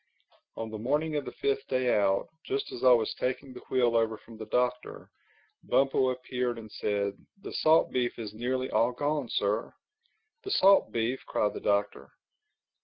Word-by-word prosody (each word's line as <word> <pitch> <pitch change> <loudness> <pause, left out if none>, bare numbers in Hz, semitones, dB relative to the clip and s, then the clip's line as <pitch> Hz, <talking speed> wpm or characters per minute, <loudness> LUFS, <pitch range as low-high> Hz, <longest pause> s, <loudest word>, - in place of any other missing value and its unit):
On 110 -1 -5
the 110 - -6
morning 150 +7 0
of 145 -2 -1
the - - -6
fifth 420 0 -1
day 130 -1 +1
out, 100 -1 +2 0.2
just 410 +1 -3
as 125 - -7
I 130 - +7
was 115 -3 +3
taking 130 +1 -2
the 125 - -9
wheel 120 -3 +2
over 115 -1 +1
from 115 - -15
the 110 -1 -8
Doctor, 125 +2 -2 0.5
Bumpo 135 -1 +2
appeared 125 -1 -2
and 110 -2 -10
said, 100 -1 -1 0.3
"The - - -7
salt 160 +1 +4
beef 125 -1 -1
is 110 -3 -6
nearly 130 +3 -2
all 120 +2 +2
gone, 145 -1 -1
Sir." 105 +2 -1 0.7
"The 395 - -6
salt 195 - +5
beef!" 120 +3 -1
cried 105 - 0
the - - -5
Doctor. 100 0 0
125 Hz, 175 wpm, -29 LUFS, 110-130 Hz, 0.7 s, I